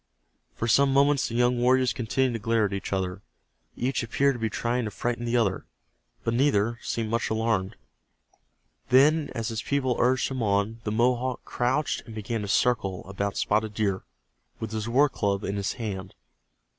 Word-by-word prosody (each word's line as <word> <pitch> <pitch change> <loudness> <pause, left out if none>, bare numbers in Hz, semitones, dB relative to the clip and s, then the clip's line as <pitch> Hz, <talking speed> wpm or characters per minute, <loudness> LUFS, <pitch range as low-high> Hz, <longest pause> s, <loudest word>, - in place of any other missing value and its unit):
For 115 - -2
some 135 +4 +4
moments 140 0 +3
the 115 - -5
young 120 0 +2
warriors 130 +1 +3
continued 130 +1 0
to 115 - -3
glare 115 0 +2
at 100 - -3
each 100 - -4
other. 95 0 -2 0.5
Each 130 +1 -1
appeared 140 +4 +1
to 120 - -7
be 110 -1 0
trying 120 +2 -1
to - - -2
frighten 120 +3 -3
the 120 +1 +1
other, 100 -5 0 0.6
but 115 - 0
neither 115 -3 +2
seemed 110 -2 -3
much 115 0 0
alarmed. 110 -2 0 1.1
Then, 145 +4 +5
as 115 -1 -2
his 115 0 -3
people 130 -3 0
urged 130 +2 +2
him 130 -2 -3
on, 105 +2 0
the 105 - -1
Mohawk 125 +2 0
crouched 130 +5 0
and 110 - -9
began 110 +1 -3
to 100 - -4
circle 100 -4 +1
about 100 +1 -3
Spotted 105 0 0
Deer, 100 -3 0 0.6
with 110 -1 -5
his 110 +1 -3
war 140 +5 +5
club 100 -6 -1
in 100 - -2
his 100 0 -1
hand. 95 -5 -5
115 Hz, 180 wpm, -26 LUFS, 105-125 Hz, 1.1 s, Then